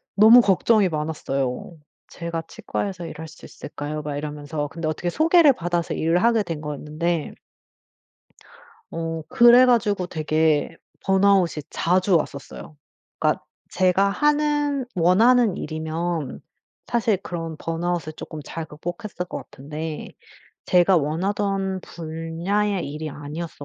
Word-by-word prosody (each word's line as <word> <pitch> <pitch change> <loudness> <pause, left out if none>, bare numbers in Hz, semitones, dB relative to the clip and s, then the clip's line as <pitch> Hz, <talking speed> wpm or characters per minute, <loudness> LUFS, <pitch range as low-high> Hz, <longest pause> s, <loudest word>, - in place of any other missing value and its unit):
너무 220 +4 +8
걱정이 205 0 +3
많았어요. 150 -2 -3 0.3
"제가 170 -1 -5
치과에서 195 -4 -4
일할 160 0 -7
수 155 - -14
있을까요." 150 +1 -6
막 145 -1 -4
이러면서. 145 0 -4
근데 165 +1 -4
어떻게 155 +3 -2
소개를 320 - +5
받아서 175 -4 -2
일을 165 +3 +1
하게 230 -2 +3
된 165 -5 -5
거였는데 150 +2 -3 1.6
어 165 -1 -4
그래 240 +1 +7
가지고 210 -6 +2
되게 155 -2 0 0.3
번아웃이 190 -5 +3
자주 185 +2 +2
왔었어요. 150 0 -5 0.4
그니까 - - +1 0.3
제가 190 +2 +3
하는 295 +2 +1
원하는 210 +5 +4
일이면 160 0 -3 0.5
사실 230 -3 +1
그런 165 -3 -5
번아웃을 165 -1 -2
쪼끔 155 0 -8
잘 165 +1 -5
극복했을 175 +6 -6
것 - - -5
같은데 150 +3 -7 0.6
제가 180 +1 +4
원하던 190 +5 -1
분야의 170 +4 -2
일이 155 +2 -5
아니었어 150 +2 -7
170 Hz, 280 characters per minute, -23 LUFS, 155-200 Hz, 1.6 s, 너무